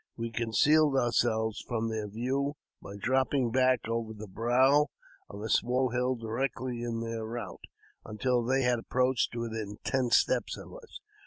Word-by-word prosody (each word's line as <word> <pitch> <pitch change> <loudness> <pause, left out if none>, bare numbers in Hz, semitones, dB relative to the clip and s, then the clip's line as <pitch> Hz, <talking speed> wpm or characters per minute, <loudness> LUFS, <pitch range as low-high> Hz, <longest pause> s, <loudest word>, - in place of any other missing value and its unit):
We 115 0 -4
concealed 135 +6 +3
ourselves 115 -3 +1
from 115 -2 -1
their 110 -1 -3
view 130 +7 -2 0.3
by 100 - -9
dropping 130 +2 +1
back 130 -2 +2
over 115 -1 -3
the 110 0 -8
brow 130 +8 +3 0.4
of 100 +1 -8
a - - -3
small 125 +3 +2
hill 125 +2 0
directly 120 +1 -3
in 115 -1 -3
their 115 -1 -4
route, 115 +2 -6 0.4
until 120 +3 0
they 130 +3 +1
had 125 -1 +2
approached 125 +1 0
within 110 -3 -4
ten 130 -2 0
steps - - +2
of - - -11
us. - - -11
120 Hz, 155 wpm, -30 LUFS, 115-130 Hz, 0.4 s, concealed